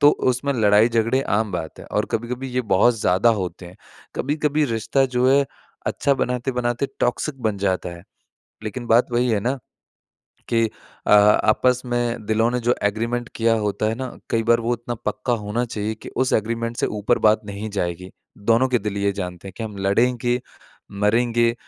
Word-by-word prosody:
तो 145 0 +8 0.2
उसमें 140 +3 -1
लड़ाई-झगड़े 115 +2 +3 0.2
आम 110 -2 -1
बात 80 -3 -5
है - - -10
और - - +1
कभी-कभी 125 +3 -3
ये 125 +1 0
बहुत 120 +5 +5
ज़्यादा 95 +6 +3
होते 90 0 -6
हैं। 90 - -13 0.4
कभी-कभी 150 +2 0
रिश्ता 115 +4 +1
जो 125 +1 +4
है 140 +1 +5 0.4
अच्छा 140 - +1
बनाते-बनाते 125 0 -1
टॉक्सिक 135 +3 -1
बन 105 -3 0
जाता 95 -2 0
है। 85 - -13 0.6
लेकिन 120 +3 -5
बात 115 +2 +4
वही 120 +1 +2
है 105 -3 +1
ना 130 +6 -1 0.9
कि 115 -1 +2 0.4
अ, - - +1
आपस 105 +4 +5
में 120 -2 -1
दिलों 110 +2 +2
ने 125 - 0
जो 120 +1 +2
एग्रीमेंट 115 +4 -1
किया 115 0 +2
होता 105 0 -1
है 110 - -1
ना, 130 +2 -4 0.2
कई 115 -1 +2
बार 115 +1 +3
वो 115 +1 -1
इतना 120 +1 -5
पक्का 125 - -1
होना 110 +4 -1
चाहिए 110 -2 -3
कि - - -7
उस 130 -1 +1
एग्रीमेंट 115 +2 -1
से - - +1
ऊपर 105 +3 0
बात 105 +1 +5
नहीं 100 +1 -5
जाएगी। 90 0 -3 0.4
दोनों 120 +3 +4
के 125 -1 +2
दिल 105 -1 -4
ये 100 0 +1
जानते 90 -1 -6
हैं 95 - -9
कि - - -5
हम 105 -2 -7
लड़ेंगे, 120 +4 +2 0.6
मरेंगे, 115 +2 +3
115 Hz, 180 wpm, -22 LUFS, 105-125 Hz, 0.9 s, तो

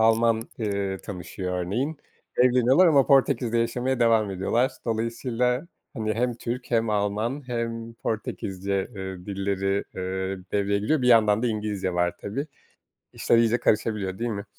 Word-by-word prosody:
Alman, 115 0 +4 0.2
eee, 100 -3 -2
tanışıyor 90 -1 -5
örneğin. 120 - -2 0.4
Evleniyorlar 125 +7 +5
ama 140 -5 +5
Portekiz'de 130 -4 +3
yaşamaya 125 +2 0
devam 115 -3 +3
ediyorlar. 115 +8 +1
Dolayısıyla, 120 +4 -1 0.3
hani, 110 -2 -1
hem 120 +2 0
Türk 120 +2 -5
hem 115 -1 +2
Alman 105 +6 -1
hem 115 -1 -3
Portekizce, 100 -3 -3
ııı, 95 -1 -6
dilleri, 100 0 -1
ııı, 95 0 -3
devreye 100 0 +1
giriyor, 130 +8 +1
bir 125 - +3
yandan 110 -2 +5
da 125 - +2
İngilizce 105 -4 -2
var 90 0 +1
tabii. 135 +9 -4 0.7
İşler 115 - +2
iyice 115 +1 +3
karışabiliyor 105 -4 0
değil 120 +1 -1
mi? 100 -2 -4
110 Hz, 140 wpm, -25 LUFS, 100-120 Hz, 0.7 s, Evleniyorlar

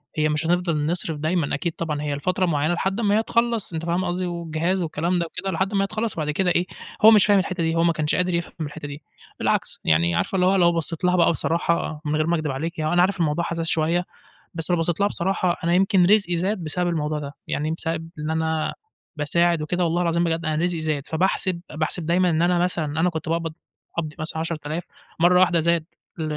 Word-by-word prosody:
هي 155 0 +2
مش 150 +1 -1
هنفضل 170 -3 +1
نصرف 165 -2 -1
دايمًا 155 0 0
أكيد 165 +3 -2
طبعًا 150 -3 -3
هي 145 -1 -2
لفترة 185 +5 0
معينة 155 -1 +1
لحد 190 +5 -1
ما 205 0 +3
هي 220 - +1
تخلص 230 -5 0
أنتِ 165 +1 -3
فاهمة 175 +2 0
قصدي، 180 +1 -2
والجهاز 170 +1 -1
والكلام 170 +3 -1
ده 170 - 0
وكده 190 +3 -5
لحد 190 +4 -1
ما 195 -1 +2
هي - - -1
تخلص 220 +1 -2
وبعد 150 -2 -2
كده 180 +5 +1
إيه 175 +1 +2 0.4
هو 220 - +9
مش 210 -3 +6
فاهم 205 -1 +5
الحتة 185 -2 -2
دي، 165 0 0
هو 165 - +2
ما 170 0 +3
كانش 155 -1 0
قادر 180 0 0
يفهم 170 0 -2
الحتة 150 0 -5
دي، 145 +1 -8 0.4
بالعكس - - 0
يعني 85 +2 +3
عارفة 195 - -1
اللي 180 - +3
هو 190 +1 +4
لو 175 -2 +4
بصّيت 165 +1 -2
لها 180 0 +3
بقى 170 -1 +4
بصراحة 165 -2 -1
من 150 +1 0
غير 155 +1 +1
ما 170 - +2
أكدب 155 -3 -2
عليكِ، 165 +6 -4
هو 155 +2 0
أنا 175 - +4
عارف 190 0 +1
الموضوع 160 +1 +1
حساس 165 -1 -3
شوية، 165 +3 +1 0.5
بس 165 0 +1
لو 175 - +3
بصّيت 165 +2 0
لها 200 - +3
بصراحة 185 -2 0
أنا 170 - +2
يمكن 190 0 +4
رزقي 195 -2 +3
زاد 185 +2 -1
بسبب 175 +3 0
الموضوع 155 -2 -1
ده، 140 -1 -7
يعني 155 +2 -1
بسبب 165 0 -3
إن 150 +1 -3
أنا 160 0 -1 0.4
باساعد 170 +2 +2
وكده 175 +4 -1
والله 170 +1 +1
العظيم 170 0 +1
بجد 165 0 -1
أنا 155 +1 0
رزقي 175 -2 0
زاد، 155 -3 -2
فباحسب 180 +1 0
باحسب 155 +2 -1
دايمًا 180 +2 +2
إن 160 -1 +1
أنا 175 0 +3
مثلًا 175 -2 0
أنا 180 +2 +3
كنت 160 -2 -5
باقبض 165 -1 -1 0.4
قبضي 155 -2 -3
مثلًا 160 0 -3
10.000 160 0 -3 0.4
مرة 180 +2 +5
واحدة 175 -2 +4
زاد 170 0 +1 0.3
ل 160 - -3
170 Hz, 230 wpm, -23 LUFS, 155-180 Hz, 0.5 s, هو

